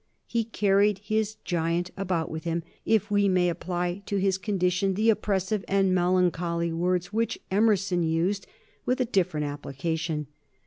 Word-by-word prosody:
He 230 -1 -1
carried 205 -2 +2
his 215 +1 -1
giant 170 +1 0
about 180 -4 -1
with 160 0 -5
him, 170 0 -1 0.2
if 215 -1 +2
we 205 -1 +3
may 180 -1 +3
apply 175 +2 -2
to 200 - -1
his 190 -1 +1
condition 190 -1 0
the 220 +3 +4
expressive 200 -1 -1
and 195 -1 +2
melancholy 175 -2 +1
words 180 +2 0
which 230 +1 0
Emerson 195 -3 +2
used 170 +5 0 0.4
with 250 +1 0
a 255 - +2
different 180 -9 0
application. 150 +2 -3
185 Hz, 145 wpm, -27 LUFS, 170-200 Hz, 0.4 s, the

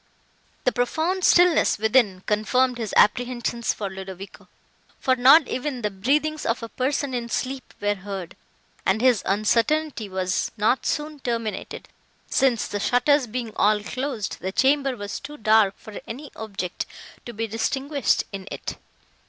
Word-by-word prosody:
The - - +3
profound 320 +9 -1
stillness 355 -2 +5
within 220 -3 +2
confirmed 245 +4 +1
his 220 -3 -3
apprehensions 240 +1 +2
for 205 - -4
Ludovico, 190 0 -9 0.5
for 260 - +2
not 265 +4 +7
even 255 -2 -3
the 210 - 0
breathings 295 +10 0
of 230 +1 -1
a 230 - -5
person 270 +2 -1
in 240 -1 -3
sleep 260 +2 -3
were 205 0 +1
heard; 195 -3 -7 0.5
and 190 +3 +2
his 245 -3 +4
uncertainty 230 +4 +1
was 185 -1 -1
not 220 +5 +1
soon 300 0 -2
terminated, 230 -5 -4 0.4
since 255 -5 +2
the 205 - -3
shutters 250 +5 +3
being 230 -1 -4
all 210 0 +3
closed, 255 -4 -4
the 190 - -3
chamber 270 +2 +2
was 205 -1 -5
too 295 +1 -9
dark 215 -3 +3
for 215 - -10
any 275 +6 -7
object 200 -5 -5 0.4
to - - -5
be 225 0 -3
distinguished 265 +5 0
in 195 -1 -7
it. - - -6
235 Hz, 145 wpm, -24 LUFS, 205-270 Hz, 0.5 s, not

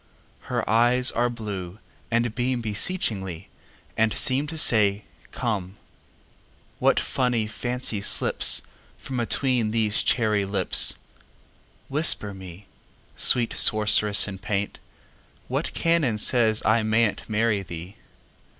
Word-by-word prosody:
Her - - -2
eyes 120 +3 +3
are 120 +1 0
blue, 100 -6 -7 0.3
and 115 0 +1
beamBeseechingly, 110 - -2 0.5
and 110 0 +1
seemTo 145 +5 0
say, 105 -7 +3 0.3
"Come!"What 105 -6 -5
funny 125 -3 -1
fancy 120 -1 -4
slipsFrom 125 +4 0
atween 120 -1 0
these 110 -1 0
cherry 110 -4 +1
lips! 95 -1 +1 0.9
Whisper 135 -8 +1
me, 95 0 -12 0.5
Sweet 120 -2 +3
sorceress 105 -1 +4
in 95 -2 -8
paint, 105 0 -4 0.7
What - - -3
canon 165 -10 0
says 110 -1 +2
I 110 +1 +3
may 110 +1 +2
n'tMarry 110 -3 -2
thee? 85 +4 -9
110 Hz, 95 wpm, -24 LUFS, 100-120 Hz, 0.9 s, sorceress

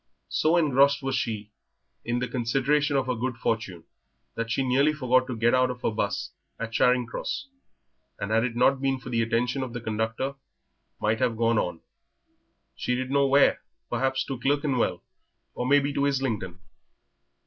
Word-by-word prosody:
So 160 +3 +2
engrossed 140 -3 +3
was 135 0 -1
she 110 -4 -2 0.5
in 120 +1 -1
the 125 +1 -1
consideration 140 +4 +1
of 135 - +1
her 125 - 0
good 120 +1 -3
fortune 105 -8 -2 0.5
that 115 0 -3
she 135 +4 0
nearly 140 +4 +3
forgot 130 -3 +2
to 130 - -4
get 115 +1 +3
out 130 0 +3
of 125 0 -6
her - - +1
'bus 100 -2 -2 0.3
at 115 -1 -5
Charing 125 +1 +3
Cross, 195 - -5 0.7
and 100 +1 -4
had 115 +1 +3
it 120 -1 -2
not 130 +2 +3
been 135 -1 0
for 130 - -9
the 115 -1 +1
attention 120 +4 0
of 130 -3 -5
the 120 - -4
conductor 110 +4 -2 0.7
might 110 +1 +1
have 125 -3 +1
gone 115 -1 +2
on, 90 -2 -3 0.9
she 125 - -1
did 130 +1 -3
not 140 - +3
know 140 - +4
where 140 +1 +4 0.3
perhaps 130 0 0
to 135 -3 -5
Clerkenwell, 140 -1 0 0.5
or 125 - -3
may 145 +2 +6
be 140 0 0
to 140 0 +1
Islington. 115 -10 -2
125 Hz, 180 wpm, -26 LUFS, 115-135 Hz, 0.9 s, may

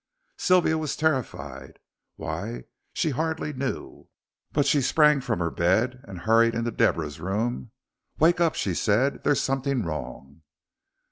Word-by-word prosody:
Sylvia 175 -3 +3
was 155 -2 -2
terrified. 70 - -2 0.4
Why, - - -5 0.3
she 160 - 0
hardly 160 +1 -2
knew: 135 0 -5 0.4
but 145 -2 +1
she 145 - +3
sprang 150 +1 +4
from 125 -4 -1
her 85 -1 -1
bed 110 +9 +1
and 95 -3 -8
hurried 115 +2 +4
into 115 0 -1
Deborah's 75 -8 0
room. 110 +7 -2 0.5
"Wake 170 +3 +4
up," 165 -2 +2
she 95 - -1
said, 115 +10 +1
"there's 145 - +2
something 135 -2 0
wrong." 70 -1 -7
120 Hz, 135 wpm, -26 LUFS, 85-145 Hz, 0.5 s, sprang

